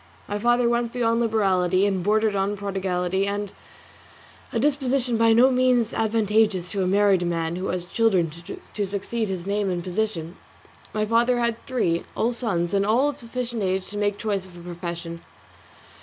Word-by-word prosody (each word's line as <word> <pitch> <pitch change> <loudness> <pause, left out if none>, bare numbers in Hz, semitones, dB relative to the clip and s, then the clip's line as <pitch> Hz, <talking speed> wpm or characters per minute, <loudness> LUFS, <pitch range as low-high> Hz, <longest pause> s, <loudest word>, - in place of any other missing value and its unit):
My 205 0 -3
father 240 +2 +3
went 235 0 0
beyond 230 -2 +1
liberality 195 -5 +2
and 195 -3 0
bordered 215 +1 +2
on 200 +1 0
prodigality, 190 -1 -1
a 200 0 -1 1.2
disposition 270 -2 +1
by 225 0 +4
no 245 +4 +6
means 250 -3 +2
advantageous 215 -4 +1
to 200 - -1
a 185 - +1
married 200 -1 +3
man 165 -1 -1
who 185 +2 -3
has 180 -1 -2
children 190 -5 +1
to 170 +5 -6
succeed 205 +3 -2
to - - -4
his 180 -1 -6
name 200 0 0
and 175 -1 -2
position. 180 -3 -3 0.5
My 215 0 -1
father 235 +3 +2
had 235 -1 -1
three, 175 -10 0 0.2
all 230 - +1
sons, 195 -8 -1
and 200 0 +2
all 235 +8 +3
of 290 - -7
sufficient 235 -1 -4
age 190 -1 -1
to 205 - -5
make 205 -1 0
choice 200 -4 -2
of 175 -1 -15
a - - -10
profession. 170 -1 -6
205 Hz, 170 wpm, -24 LUFS, 185-230 Hz, 1.2 s, no